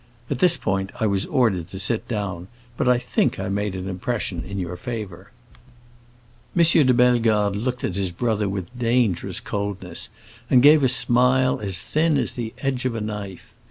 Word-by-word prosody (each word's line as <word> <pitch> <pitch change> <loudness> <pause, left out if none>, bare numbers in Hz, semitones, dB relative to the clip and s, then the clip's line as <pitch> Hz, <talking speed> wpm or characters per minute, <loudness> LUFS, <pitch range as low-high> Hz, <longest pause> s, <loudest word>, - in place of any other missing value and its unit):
At 135 - -1
this 180 -2 +5
point 95 +1 -2
I 110 - +1
was 100 -1 0
ordered 100 -10 +1
to 95 - -8
sit 105 +4 -1
down, 100 -6 -4 0.3
but 125 - 0
I 125 - +4
think 120 - 0
I - - -3
made 100 0 -2
an 95 0 -5
impression 95 -1 -3
in 100 0 -7
your 90 -2 -4
favor." 105 -5 -7 1.3
M. 170 - +5
de 155 -5 +5
Bellegarde 115 -5 +3
looked 125 +4 -3
at 90 - -2
his 95 -2 0
brother 105 +1 -1
with 100 +4 -5
dangerous 120 -5 0
coldness, 100 -4 -4 0.4
and 125 -1 +5
gave 150 +1 +7
a 130 - +3
smile 125 +1 +3
as 95 -4 0
thin 155 - +1
as - - 0
the 115 -2 -5
edge 130 -2 -2
of 125 -2 -1
a 115 - -3
knife. 105 -3 -7
110 Hz, 180 wpm, -23 LUFS, 95-125 Hz, 1.3 s, gave